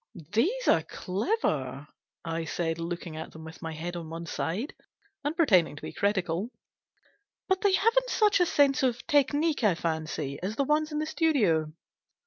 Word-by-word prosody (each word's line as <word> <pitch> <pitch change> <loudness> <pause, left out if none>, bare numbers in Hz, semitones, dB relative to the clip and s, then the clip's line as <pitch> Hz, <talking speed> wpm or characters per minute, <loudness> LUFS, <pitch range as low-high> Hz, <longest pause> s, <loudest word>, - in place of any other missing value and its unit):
" 165 +4 -16
These 410 - +1
are - - +5
clever," 155 - -2 0.4
I 165 0 -2
said, 165 0 -2
looking 170 -1 -5
at 160 - -7
them 160 - -10
with 160 0 -11
my 160 0 -4
head 170 +3 -5
on 165 -2 -6
one 165 +1 -6
side, 185 - -3 0.5
and 295 +3 -1
pretending 185 - +4
to 145 - -10
be - - -6
critical; 190 0 0 0.5
" 410 0 -40
but 380 -1 +1
they 405 -2 +3
haven't 465 +6 +3
such 420 -4 +3
a 355 - +4
sense 285 -1 +3
of 250 -2 0
technique, 290 +1 +2
I 200 -5 +4
fancy, 160 -4 -3
as 195 +4 -3
the 280 - +1
ones 305 +2 +1
in 300 - -2
the 305 - 0
studio." 215 - +2
200 Hz, 180 wpm, -28 LUFS, -, 0.5 s, are